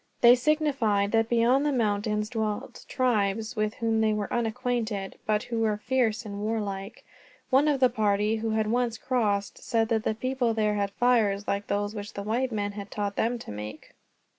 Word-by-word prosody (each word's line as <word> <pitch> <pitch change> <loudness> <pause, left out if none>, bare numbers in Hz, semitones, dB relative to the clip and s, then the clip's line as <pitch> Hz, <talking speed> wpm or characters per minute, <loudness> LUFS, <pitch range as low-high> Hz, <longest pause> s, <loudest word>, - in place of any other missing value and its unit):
They 240 0 +9
signified 250 -7 +1
that 225 0 +2
beyond 240 +4 +3
the 295 - +1
mountains 210 -3 0
dwelt 215 -3 -4
tribes 220 -4 0
with 215 0 -1
whom 225 -1 0
they 220 -1 +3
were 210 -1 -3
unacquainted, 230 -4 -2
but 215 0 +1
who 230 -1 -3
were 215 -2 +1
fierce 235 -1 0
and 200 -1 -6
warlike. 205 -2 -4 0.5
One 270 +3 +5
of 290 -2 +2
the 255 - +6
party, 215 -1 +1
who 225 +1 -2
had 220 0 +1
once 235 +1 0
crossed, 210 -6 -1
said 225 -2 0
that 220 -2 +1
the 220 - 0
people 250 -1 -1
there 215 -1 +1
had 200 -1 0
fires 210 -3 +2
like 200 +1 -1
those 205 +1 -1
which 205 -1 -7
the 200 - -5
white 245 +5 -1
men 205 -2 -2
had 200 0 -8
taught 205 -1 -3
them 235 +2 0
to 230 - -9
make. 105 +1 -8
220 Hz, 190 wpm, -27 LUFS, 205-240 Hz, 0.5 s, They